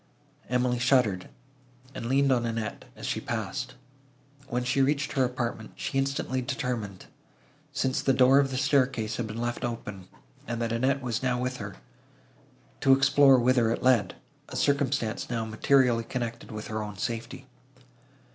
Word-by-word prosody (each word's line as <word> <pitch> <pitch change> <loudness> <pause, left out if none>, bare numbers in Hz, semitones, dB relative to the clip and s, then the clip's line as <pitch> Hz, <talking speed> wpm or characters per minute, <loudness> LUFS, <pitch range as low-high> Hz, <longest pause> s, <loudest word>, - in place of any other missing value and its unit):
Emily 125 0 +1
shuddered, 125 -7 +2 0.6
and 115 - -5
leaned 135 +2 +3
on 120 -2 +2
Annette, 115 -2 -4
as - - -8
she - - -2
passed. 120 +4 -4 0.7
When 125 +1 -1
she 125 +2 +1
reached 140 +1 +1
her 135 - +2
apartment, 120 -3 -3
she 135 - -2
instantly 135 -1 -1
determined, 120 -7 -4 0.7
since 135 -2 0
the 135 - +2
door 130 +1 +6
of 140 -1 +2
the 130 - -3
staircase 125 -5 +1
had 120 - -2
been 110 +1 -6
left 120 0 -3
open, 105 -6 -5 0.4
and 120 -1 -3
that 115 -1 -1
Annette 130 +4 +1
was 120 -3 -2
now 125 -1 0
with 125 0 -2
her, 100 -3 -7 1.0
to 135 - +5
explore 135 0 +6
whither 120 -2 +3
it 115 - -2
led,—a 115 -8 0
circumstance 140 -6 0
now 115 -2 -1
materially 120 +1 +3
connected 120 -1 -5
with 105 -1 -6
her 110 0 -3
own 105 -2 -6
safety. 115 +4 -4
125 Hz, 155 wpm, -28 LUFS, 115-135 Hz, 1.0 s, door